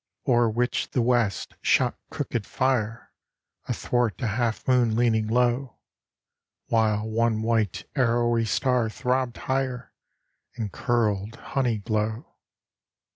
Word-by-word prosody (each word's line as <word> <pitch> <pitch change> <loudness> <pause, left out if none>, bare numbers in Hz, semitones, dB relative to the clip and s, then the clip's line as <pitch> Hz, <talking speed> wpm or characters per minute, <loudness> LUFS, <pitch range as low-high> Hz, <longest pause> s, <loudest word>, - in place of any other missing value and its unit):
O'er 120 -2 +4
which 120 +3 -1
the 125 - 0
west 115 -6 +1
shot - - +3
crooked 115 -4 -3
fire 120 -3 -1 0.6
Athwart 120 -3 0
a 115 - +1
half 115 +1 -1
moon 125 -4 +3
leaning 110 -2 +2
low; 125 +2 +1 0.9
While 110 -1 +2
one 110 0 +1
white, 110 -4 0
arrowy 120 -3 +2
star 125 0 +1
throbbed 125 +1 -1
higher 130 -2 -2 0.6
In 110 -4 -3
curdled 110 -2 0
honey 125 -4 -1
glow. 110 +5 -2
115 Hz, 110 wpm, -25 LUFS, 110-125 Hz, 0.9 s, O'er